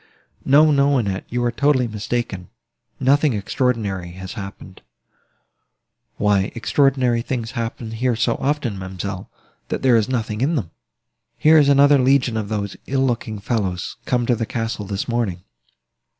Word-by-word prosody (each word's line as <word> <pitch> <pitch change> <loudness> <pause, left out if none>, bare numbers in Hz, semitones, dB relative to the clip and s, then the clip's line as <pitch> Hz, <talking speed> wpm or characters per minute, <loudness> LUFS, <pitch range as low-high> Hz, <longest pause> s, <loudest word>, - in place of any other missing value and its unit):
"No, 150 +3 +5
no, 140 -1 +3
Annette, 100 -6 -2
you 120 +1 -1
are 120 - +1
totally 140 -2 +2
mistaken, 105 -3 -4 0.5
nothing 140 +1 +3
extraordinary 100 -5 -2
has 95 +1 -8
happened." 95 -3 -9 1.4
"Why, 100 -1 +2
extraordinary 125 -1 +2
things 120 -1 -4
happen 115 -2 -4
here 120 +2 0
so 115 - +1
often, 135 -8 -1
ma'amselle, 95 0 -6 0.4
that - - -4
there 130 -3 +5
is 110 0 +2
nothing 115 -3 -2
in 155 +6 +1
them. 100 - -3 0.7
Here 155 +1 +6
is 145 -1 +4
another 140 0 +6
legion 130 -2 +3
of 110 -2 -3
those 100 -2 -3
ill 135 0 +1
looking 115 -3 -2
fellows, 100 -4 -3
come 125 -1 0
to 120 - +2
the 115 0 -3
castle, 115 -3 -3
this 100 -1 -3
morning." 115 -7 -2
115 Hz, 150 wpm, -21 LUFS, 100-130 Hz, 1.4 s, Here